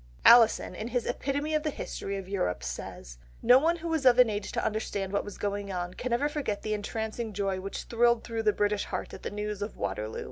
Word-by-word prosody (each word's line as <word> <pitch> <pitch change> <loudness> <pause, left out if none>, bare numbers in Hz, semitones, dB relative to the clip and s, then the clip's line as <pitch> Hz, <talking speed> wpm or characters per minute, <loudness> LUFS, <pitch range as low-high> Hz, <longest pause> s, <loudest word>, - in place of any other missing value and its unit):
Alison 235 -2 +7
in 215 - -5
his 245 0 -1
Epitome 285 +5 -2
of 305 - +2
the 305 - -1
History 200 -7 -5
of 190 -1 -7
Europe 90 - -1
says, - - -7 0.2
"No 250 +1 +8
one 330 +4 +2
who 340 0 -6
was 320 -3 0
of 250 -2 +6
an 250 -3 +6
age 205 -1 -3
to - - -1
understand 205 -2 -2
what 200 - +1
was 205 - -8
going 200 -1 -3
on 180 -1 -3
can 250 +5 -4
ever 250 +5 +2
forget 290 -9 -3
the 215 - -1
entrancing 220 +1 -3
joy 195 -1 -1
which 195 +1 -5
thrilled 235 0 +2
through 230 -1 -3
the 215 -1 +3
British 205 0 0
heart - - -5
at - - -8
the - - -4
news 210 0 -4
of 205 +1 -4
Waterloo. 110 +1 -3
215 Hz, 235 wpm, -29 LUFS, 200-245 Hz, 0.2 s, No